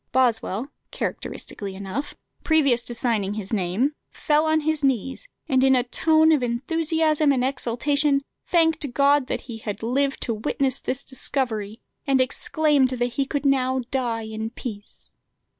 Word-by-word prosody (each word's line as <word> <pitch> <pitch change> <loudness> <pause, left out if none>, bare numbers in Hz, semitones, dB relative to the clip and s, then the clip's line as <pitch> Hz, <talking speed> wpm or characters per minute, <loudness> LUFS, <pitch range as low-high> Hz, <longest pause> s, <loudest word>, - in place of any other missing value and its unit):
Boswell, 245 0 +1 0.2
characteristically 195 -2 -5
enough, 200 +9 -5 0.3
previous 280 -7 +3
to 240 0 -2
signing 215 -4 0
his 210 0 -3
name, 205 +9 0 0.2
fell 305 +1 +1
on 315 0 +2
his 310 -1 -1
knees, 265 - -1 0.2
and, 260 -1 +3
"in 265 0 +5
a 250 - +2
tone 315 +5 +3
of 300 -4 +3
enthusiasm 310 +4 +1
and 255 -2 +1
exultation, 275 +3 +1 0.2
thanked 320 -6 +2
God 280 -1 +4
that - - -2
he 230 -3 -8
had 210 -1 -6
lived 270 +4 0
to 235 - -1
witness 260 +5 0
this 265 +1 -2
discovery, 230 -5 -2 0.3
and 270 -1 +3
exclaimed 280 +1 +2
that 245 -1 -1
he 270 +1 -1
could 285 0 -3
now 260 -1 +2
die 240 -4 -1
in 220 0 -5
peace." 215 -3 -9
260 Hz, 150 wpm, -24 LUFS, 230-290 Hz, 0.3 s, in